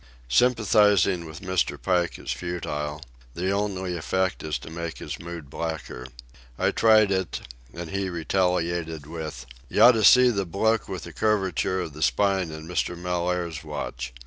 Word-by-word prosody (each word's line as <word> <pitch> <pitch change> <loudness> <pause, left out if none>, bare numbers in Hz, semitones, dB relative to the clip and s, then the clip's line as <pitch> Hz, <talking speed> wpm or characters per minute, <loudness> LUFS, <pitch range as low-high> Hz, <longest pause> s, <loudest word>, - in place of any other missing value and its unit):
Sympathizing 105 - +4
with 80 +1 -9
Mr. 90 -1 -1
Pike 90 -2 0
is - - -5
futile; 75 -4 -4 0.3
the 90 +3 -1
only 95 -3 -1
effect 95 +3 -1
is 75 -1 -2
to - - -11
make 85 0 -5
his 75 - -6
mood 85 -3 -8
blacker. 70 -5 -5 0.5
I - - +2
tried 110 -2 +5
it, 95 -2 -1 0.3
and 85 -1 -7
he 100 -1 -1
retaliated 85 -3 -1
with: 80 -5 -6 0.2
"You - - +4
oughta 115 -3 +7
see 125 +3 +7
the 100 -4 -2
bloke 110 +6 +1
with 85 -3 -6
curvature 95 -4 +1
of 80 - -6
the 75 - -10
spine 95 -1 +2
in 80 0 -8
Mr. 90 0 -1
Mellaire's 90 -2 -2
watch. 60 0 -5
90 Hz, 150 wpm, -25 LUFS, 80-95 Hz, 0.5 s, oughta